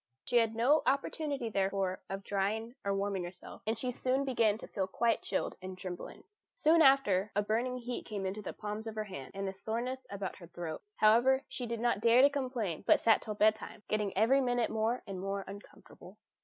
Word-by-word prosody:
She 245 - +1
had 225 -1 +3
no 265 +7 +4
opportunity, 280 -1 0
therefore, 195 -1 0
of 195 0 -4
drying 210 +4 -1
or 200 - 0
warming 195 -2 -1
herself, 175 +1 -10
and 220 0 0
she 250 +2 -2
soon 260 +3 0
began 230 -5 +2
to - - -10
feel 190 -2 -2
quite 230 +4 +1
chilled - - -2
and 185 0 -7
trembling. 180 -1 -7 0.3
Soon 320 +2 +4
after 215 -9 +4
a 205 - +2
burning 235 +4 0
heat 245 0 -5
came 200 -3 -4
into 195 +3 -3
the - - -5
palms 210 +1 -5
of 220 - -5
her 215 - -1
hands, 185 -7 -9
and 195 0 -3
a 190 - -3
soreness 245 +6 -4
about 200 -2 -5
her 170 - -12
throat; 165 -2 -6
however, 240 +5 +4
she 245 - -5
did 230 0 -3
not 240 -3 +1
dare 235 +3 +6
to 285 - +6
complain, 250 - -2
but - - +6
sat 225 -1 +4
till 215 -2 -5
bedtime, 215 0 +1
getting 210 -2 0
every 250 +6 +4
minute 245 -2 +1
more 220 +3 0
and 195 -3 -6
more 195 0 -3
uncomfortable. 200 0 -12
220 Hz, 205 wpm, -32 LUFS, 195-245 Hz, 0.3 s, dare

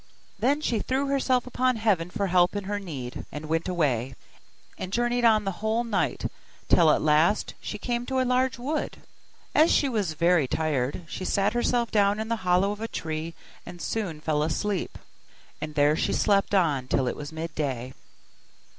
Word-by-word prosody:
Then 275 +7 +2
she 235 -7 0
threw 265 +5 -1
herself 260 -2 +1
upon 255 0 +1
Heaven 205 -7 +1
for 200 +1 -2
help 180 0 +3
in 205 - -2
her 205 +1 -3
need, 135 -10 -6
and 150 +1 -6
went 160 +2 -1
away, 135 -7 0 0.6
and 185 - -6
journeyed 240 +2 +1
on 220 -2 +5
the 195 - 0
whole 220 +2 +1
night, 230 - -1 0.4
till 165 -3 +5
at - - +3
last 155 +6 +3
she 210 - -5
came 240 +3 -3
to 265 0 0
a 255 - +2
large 255 +1 +1
wood. 285 +6 -3 0.6
As 315 +3 +5
she 285 - +3
was 210 -10 -1
very 170 -2 +3
tired, 145 +1 -1
she 185 - -6
sat 195 +1 +1
herself 240 0 +1
down 205 0 +3
in 220 +1 -3
the 230 - 0
hollow 185 +2 +2
of 210 +1 -6
a 225 - -2
tree 160 -3 -4 0.3
and 175 0 -10
soon 180 -6 -3
fell 150 -1 0
asleep: 180 +6 -2 0.6
and 155 0 -5
there 145 +1 +4
she - - 0
slept 200 0 +2
on 145 -9 +2
till 130 0 +1
it - - -1
was 145 +1 -7
midday. 145 -6 -4
190 Hz, 180 wpm, -26 LUFS, 155-230 Hz, 0.6 s, on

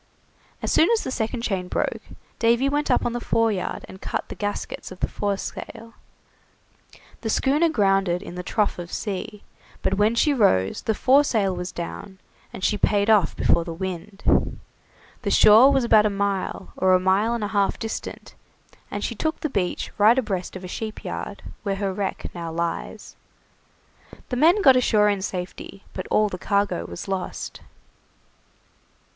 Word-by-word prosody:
As - - -1
soon 320 - +4
as 460 -1 +2
the - - -4
second 230 0 -2
chain 190 -5 -2
broke, - - -2 0.4
Davy 235 +3 +3
went 290 +1 0
up - - +2
on 240 - -1
the 240 - -2
fore 230 -1 +1
yard 190 -3 -4
and 190 - -12
cut - - -4
the - - -5
gaskets 205 -2 -4
of 185 - -10
the - - 0
foresail. 220 +3 -5 1.3
The 225 - -3
schooner 290 +8 +2
grounded 195 - +1
in 175 - -8
the 180 - -5
trough 205 +1 -1
of 175 0 -7
sea, 205 +1 -5 0.4
but - - +1
when 215 +3 +3
she 290 +5 +3
rose 95 - +2
the 220 - -1
foresail 245 -8 +3
was 180 +1 -5
down, 190 +3 -7 0.3
and 185 - -9
she 210 - +1
paid 205 +1 +3
off 210 -5 +3
before 170 - +2
the 165 -1 -6
wind. 190 +2 -1 0.6
The - - -2
shore 225 +6 +7
was 270 -2 +2
about 215 -2 +5
a - - 0
mile, 200 -2 -2
or 185 0 +4
a - - +4
mile 195 +5 +2
and 230 - -3
a 205 - -2
half 200 -1 +1
distant, 225 -1 -6 0.6
and - - -4
she - - -2
took 315 0 -2
the 310 - -2
beach 180 -6 -2
right 220 +4 +6
abreast 195 -8 -2
of 185 - -7
a - - -6
sheep 215 +4 -6
yard, - - -5 0.2
where 200 -3 -1
her 195 -1 -2
wreck 195 0 -4
now 170 -2 -5
lies. 170 +1 -4 1.1
The 250 - -2
men 340 +10 +4
got 265 -2 +8
ashore 215 -4 +4
in 200 -2 0
safety, 190 +1 -6
but 185 - -5
all 215 0 +3
the 180 -3 -6
cargo 200 - 0
was 85 - -7
lost. 190 -2 -4
205 Hz, 175 wpm, -24 LUFS, 190-230 Hz, 1.3 s, got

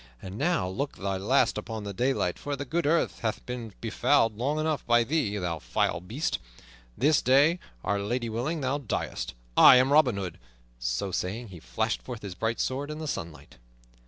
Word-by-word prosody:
And 95 +6 -8
now 155 - +1
look 135 +10 -3
thy 95 0 -2
last 115 +3 +2
upon 110 0 -6
the 100 -1 -5
daylight, 125 +6 0
for 145 0 -3
the 140 +1 -5
good 165 +4 -1
earth 165 +2 +1
hath 110 -2 -3
been 120 -3 -6
befouled 115 -2 +2
long 135 +7 -1
enough 155 -1 -1
by 120 0 +5
thee, 115 -6 0
thou 85 -4 -2
vile - - 0
beast! 115 - -2 0.6
This 150 +2 +3
day, 145 +7 +4 0.2
Our 100 - 0
Lady 120 +4 -2
willing, 130 +9 -2
thou 135 +2 0
diest 125 - -3 0.2
I - - +9
am 130 +2 +4
Robin 135 -8 +5
Hood." 90 -4 -5 0.4
So - - -2
saying, 105 +6 -3
he 90 -3 -10
flashed 110 +7 -2
forth 120 -4 -8
his 100 -3 -5
bright 115 +5 -2
sword 140 +3 -2
in 150 - -5
the 155 0 -5
sunlight. 85 - -6
120 Hz, 190 wpm, -28 LUFS, 100-140 Hz, 0.6 s, I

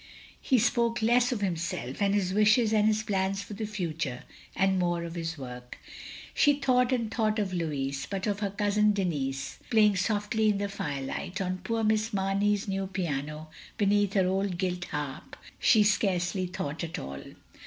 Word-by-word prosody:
He 260 - +3
spoke 235 0 +1
less 245 +2 +4
of 235 -4 -2
himself 170 -7 -3
and 200 0 +3
his 190 -2 0
wishes 215 +2 +4
and 215 -1 +4
his 215 0 +2
plans 195 -1 -1
for 205 - -9
the 215 +1 -4
future, 165 -10 -3 0.3
and 190 -1 +2
more 175 -1 0
of 170 -1 -6
his 165 -1 -4
work. 125 -2 -8 0.6
She 290 - +5
thought 250 -2 +3
and 230 -4 -1
thought 220 -2 +1
of 205 -3 -1
Lotiis, 140 -5 -2
— - - -23
^but 195 -1 -2
of 205 -2 -1
her 205 -2 -1
cousin 210 +1 +2
Denis, 140 -8 -2
playing 210 -3 +4
softly 210 +3 +1
in 205 - +2
the 200 0 -2
firelight, 150 +1 -4
on 185 -1 -2
poor 225 +5 -2
Miss 215 +1 +1
Mamey's 200 +2 +1
new 195 0 -2
piano, 155 -4 -4 0.3
beneath 205 -1 +2
her 190 -2 +3
old 190 0 0
gilt 180 -1 -2
harp— 145 -3 -5 0.3
^he 215 -2 +5
scarcely 185 -2 +1
thought 155 -3 -4
at 165 - -4
all. 70 0 -6
195 Hz, 175 wpm, -28 LUFS, 170-210 Hz, 0.6 s, She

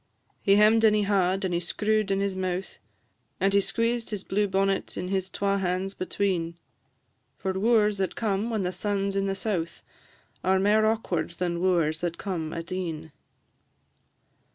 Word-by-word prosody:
He 195 - +4
hem'd 215 +2 +5
and 215 -1 +6
he 210 - +2
haw'd, 195 -1 +1
and 180 - -1
he 170 - +1
screw'd 210 +4 0
in 195 0 +1
his 200 -1 -1
mouth, 185 0 -3 0.6
And 195 +1 +2
he 200 - +5
squeezed 230 +3 0
his 205 -3 -4
blue 205 +1 0
bonnet 195 0 0
his 190 0 -2
twa 200 0 0
hands 185 +1 -1
between; 180 -3 -2 0.8
For 190 - -2
wooers 210 0 +2
that 190 - -1
come 215 0 -1
when 220 -4 -1
the 180 - -1
sun 200 +1 -1
's - - -8
in 195 0 +1
the 195 - -1
south 190 -5 -3 0.6
Are 190 0 +3
mair 210 +3 +3
awkward 225 +1 -1
than 175 -1 -1
wooers 170 -4 +1
that 175 -1 -2
come 170 -6 -3
at 165 +2 -6
e'en. 165 -4 -4
195 Hz, 170 wpm, -27 LUFS, 180-205 Hz, 0.8 s, and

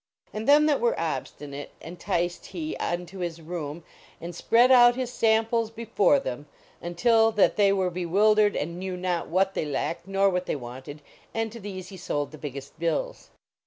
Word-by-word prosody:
And 215 +1 -5
them 295 +1 +7
that 295 -5 +2
were 235 - +1
obstinate 145 -3 -5
enticed 175 +1 -3
he 160 -4 -5
unto 175 +2 -4
his 170 -2 -4
room, 160 -1 -6 0.4
and 175 +1 -7
spread 235 +8 +4
out 240 -1 +7
his 255 -1 -4
samples 225 0 +2
before 230 +4 +2
them 145 - -6 0.3
until 225 +6 +3
that 210 - +3
they 200 -2 +4
were 190 -2 +1
bewildered 205 +4 +3
and 170 +4 -3
knew 185 -1 -4
not 180 -2 -2
what 190 +3 +1
they - - -1
lacked 165 +4 -3
nor 195 0 +2
what 180 0 -2
they - - -1
wanted, 130 +3 -9 0.3
and 225 -1 -1
to 230 - -9
these 190 -3 -7
he 190 - -10
sold 145 -4 -3
the 155 - -11
biggest 140 +1 -8
bills. 165 -2 -2
185 Hz, 175 wpm, -26 LUFS, 165-220 Hz, 0.4 s, them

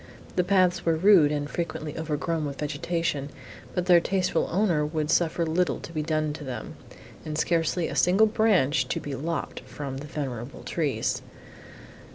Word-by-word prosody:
The 180 - +3
paths 180 -1 +3
were 165 -1 +2
rude 170 -3 +6
and 145 -1 -1
frequently 160 -2 -4
overgrown 160 +1 -2
with 140 -1 -5
vegetation, 150 -1 -2 0.5
but 180 - 0
their 175 -2 +7
tasteful 190 +1 0
owner 175 -5 +2
would 155 0 -1
suffer 170 -1 +2
little 170 +3 0
to 165 - -10
be 155 - -1
done 155 -1 0
to 150 - -8
them, 125 -5 -6 0.5
and 150 0 -4
scarcely 165 +1 +1
a - - -5
single 190 +5 +5
branch 185 - +2
to - - -2
be 145 - -6
lopped 155 +3 -3
from 140 -2 -7
the 145 +2 -7
venerable 130 -4 -5
trees. 150 -5 -1
160 Hz, 165 wpm, -26 LUFS, 145-175 Hz, 0.5 s, their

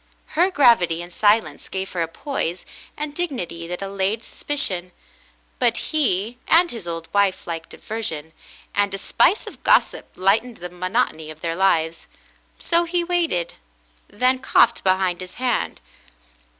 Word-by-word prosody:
Her 350 +4 +4
gravity 230 - +4
and 175 0 -12
silence 215 +4 +2
gave 190 0 -4
her 175 - -2
a 165 - 0
poise 180 - -4 0.3
and 295 0 -4
dignity 240 - -4
that 180 +3 -5
allayed 195 +3 -1
sus - - -12
picion, 185 -11 0 0.7
but 240 -2 +3 0.2
he 240 -5 +1
and 345 +1 +5
his 225 -7 -7
old 165 -1 -5
wife 200 -2 +2
liked 165 -1 -5
diversion, 160 -8 -5 0.4
and 205 -1 +1
a - - -4
spice 365 - +2
of - - -11
gossip - - +3
lightened 215 +6 +2
the 180 0 -8
monotony 180 -3 -1
of 155 0 -11
their 165 -1 -2
lives, 165 -3 +1 0.5
so 340 0 +2
he 345 0 0
waited, 335 - 0 0.5
then 255 +5 +2
coughed 265 - +3
behind 185 -1 +1
his 185 0 -9
hand. 250 -2 -1
195 Hz, 150 wpm, -22 LUFS, 175-255 Hz, 0.7 s, and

